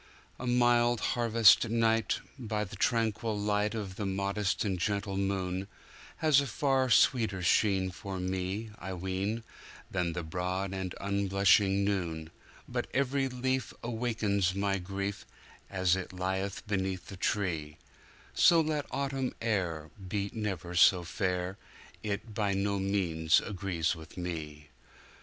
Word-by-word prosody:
A 125 Hz, -, -4 dB
mild 120 Hz, -1 st, +3 dB
harvest 115 Hz, -2 st, +5 dB
night, 115 Hz, -1 st, +2 dB, 0.2 s
by 110 Hz, -3 st, -2 dB
the 105 Hz, 0 st, -8 dB
tranquil 110 Hz, 0 st, 0 dB
lightOf 105 Hz, -1 st, -1 dB
the 105 Hz, -, -2 dB
modest 100 Hz, +2 st, -1 dB
and 95 Hz, -3 st, -1 dB
gentle 100 Hz, +2 st, -1 dB
moon, 95 Hz, -1 st, -1 dB, 0.5 s
Has 150 Hz, -3 st, +5 dB
a 140 Hz, -, -3 dB
far 135 Hz, +1 st, +1 dB
sweeter 110 Hz, -6 st, +3 dB
sheen 95 Hz, +1 st, +3 dB
for 95 Hz, +1 st, -6 dB
me, 95 Hz, +4 st, -3 dB
I 95 Hz, +2 st, -5 dB
ween, 95 Hz, +5 st, -2 dB, 0.5 s
Than 90 Hz, -3 st, 0 dB
the 85 Hz, 0 st, -3 dB
broad 90 Hz, +4 st, -2 dB
and 95 Hz, -2 st, -4 dB
unblushing 100 Hz, 0 st, +3 dB
noon, 85 Hz, -5 st, -2 dB, 0.4 s
But -, -, -2 dB
every 135 Hz, 0 st, +1 dB
leaf 130 Hz, 0 st, -2 dB
awakens 110 Hz, -5 st, 0 dB
my 100 Hz, 0 st, 0 dB
grief, 100 Hz, +2 st, -4 dB, 0.5 s
As 95 Hz, -2 st, +2 dB
it 95 Hz, -1 st, -5 dB
lieth 95 Hz, +1 st, -3 dB
beneath 95 Hz, -3 st, -2 dB
the 95 Hz, -, -9 dB
tree; 80 Hz, -7 st, -1 dB, 0.6 s
So 170 Hz, -, +6 dB
let 155 Hz, -2 st, 0 dB
Autumn 135 Hz, -1 st, -2 dB
air 90 Hz, -9 st, -1 dB, 0.2 s
be 100 Hz, +1 st, -2 dB
never 95 Hz, -6 st, -3 dB
so 90 Hz, +1 st, +6 dB
fair, 90 Hz, +1 st, -2 dB, 0.4 s
It 105 Hz, +2 st, -4 dB
by 100 Hz, -2 st, 0 dB
no 100 Hz, 0 st, 0 dB
means 90 Hz, -5 st, +2 dB
agrees 95 Hz, -5 st, -1 dB
with 80 Hz, +1 st, -12 dB
me. 75 Hz, -4 st, -5 dB
100 Hz, 130 wpm, -31 LUFS, 95-110 Hz, 0.6 s, So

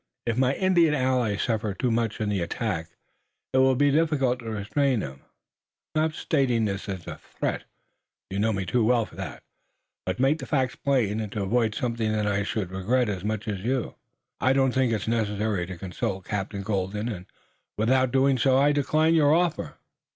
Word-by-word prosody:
If 115 Hz, -2 st, 0 dB
my 130 Hz, +2 st, +2 dB
Indian 175 Hz, -5 st, +3 dB
allies 125 Hz, -6 st, +1 dB
suffer 110 Hz, -4 st, -1 dB
too 125 Hz, +2 st, 0 dB
much 115 Hz, -1 st, 0 dB
in 105 Hz, -1 st, -1 dB
the 100 Hz, -3 st, 0 dB
attack 85 Hz, -2 st, -2 dB, 0.6 s
it 130 Hz, -, +4 dB
will 130 Hz, 0 st, +5 dB
be 145 Hz, +2 st, +3 dB
difficult 140 Hz, -5 st, +2 dB
to 115 Hz, -2 st, -7 dB
restrain 110 Hz, +4 st, 0 dB
them. 70 Hz, -3 st, -7 dB, 0.7 s
I'm 155 Hz, -, +2 dB
not 160 Hz, 0 st, +1 dB
stating 125 Hz, -9 st, +1 dB
this 100 Hz, -1 st, -3 dB
as 95 Hz, -3 st, -5 dB
a -, -, -7 dB
threat -, -, -4 dB, 0.7 s
you 100 Hz, -, -2 dB
know 110 Hz, +2 st, +2 dB
me 95 Hz, -2 st, -2 dB
too 120 Hz, +4 st, +1 dB
well 115 Hz, 0 st, +3 dB
for -, -, -16 dB
that -, -, -6 dB, 0.6 s
but 95 Hz, -, 0 dB
to -, -, -2 dB
make 145 Hz, +4 st, +3 dB
the -, -, -7 dB
facts 130 Hz, -4 st, 0 dB
plain, 120 Hz, -7 st, +1 dB
and 105 Hz, -2 st, -4 dB
to 105 Hz, -, -2 dB
avoid 110 Hz, +2 st, +1 dB
something 115 Hz, -3 st, -1 dB
that 105 Hz, -1 st, 0 dB
I 100 Hz, -1 st, +1 dB
should 100 Hz, -2 st, -3 dB
regret 110 Hz, +6 st, +1 dB
as 95 Hz, -3 st, -3 dB
much 110 Hz, +1 st, -3 dB
as 100 Hz, -3 st, -2 dB
you." 125 Hz, +5 st, -1 dB, 0.5 s
"I 130 Hz, -, +3 dB
don't 135 Hz, -1 st, +3 dB
think 130 Hz, -2 st, +1 dB
it 110 Hz, -2 st, -2 dB
necessary 105 Hz, -4 st, 0 dB
to 95 Hz, -1 st, -7 dB
consult 95 Hz, +1 st, -4 dB
Captain 100 Hz, -1 st, -3 dB
Colden, 100 Hz, +1 st, -2 dB
and 95 Hz, -6 st, -6 dB, 0.5 s
without 130 Hz, +4 st, +3 dB
doing 135 Hz, -1 st, +3 dB
so 130 Hz, +3 st, +4 dB
I 145 Hz, +2 st, +4 dB
decline 155 Hz, +3 st, +2 dB
your 155 Hz, -2 st, +5 dB
offer. 170 Hz, -2 st, 0 dB
115 Hz, 195 wpm, -26 LUFS, 100-130 Hz, 0.7 s, will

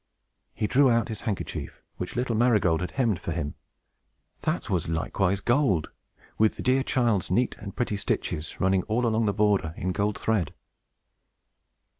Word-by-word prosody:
He -, -, -1 dB
drew 135 Hz, +4 st, +4 dB
out 115 Hz, -2 st, +2 dB
his 110 Hz, -, -5 dB
handkerchief, 105 Hz, -4 st, -4 dB, 0.2 s
which 90 Hz, -, -5 dB
little 120 Hz, -1 st, 0 dB
Marygold 105 Hz, -8 st, +3 dB
had 90 Hz, -, -2 dB
hemmed 115 Hz, -9 st, +1 dB
for -, -, -4 dB
him. 75 Hz, -1 st, -3 dB, 0.9 s
That -, -, -2 dB
was 90 Hz, -2 st, -1 dB
likewise 95 Hz, +4 st, 0 dB
gold, 120 Hz, -, +2 dB, 0.5 s
with 110 Hz, 0 st, +4 dB
the -, -, -6 dB
dear 130 Hz, +1 st, +3 dB
child's 120 Hz, -8 st, +1 dB
neat 120 Hz, +8 st, +1 dB
and 100 Hz, -2 st, -8 dB
pretty 115 Hz, -4 st, -1 dB
stitches 80 Hz, -5 st, -3 dB
running 95 Hz, 0 st, +3 dB
all 115 Hz, +3 st, +1 dB
along 110 Hz, -1 st, +2 dB
the -, -, +3 dB
border, 100 Hz, -5 st, +1 dB
in 90 Hz, -, -1 dB
gold 100 Hz, +2 st, 0 dB
thread! 105 Hz, -8 st, 0 dB
105 Hz, 160 wpm, -27 LUFS, 90-120 Hz, 0.9 s, drew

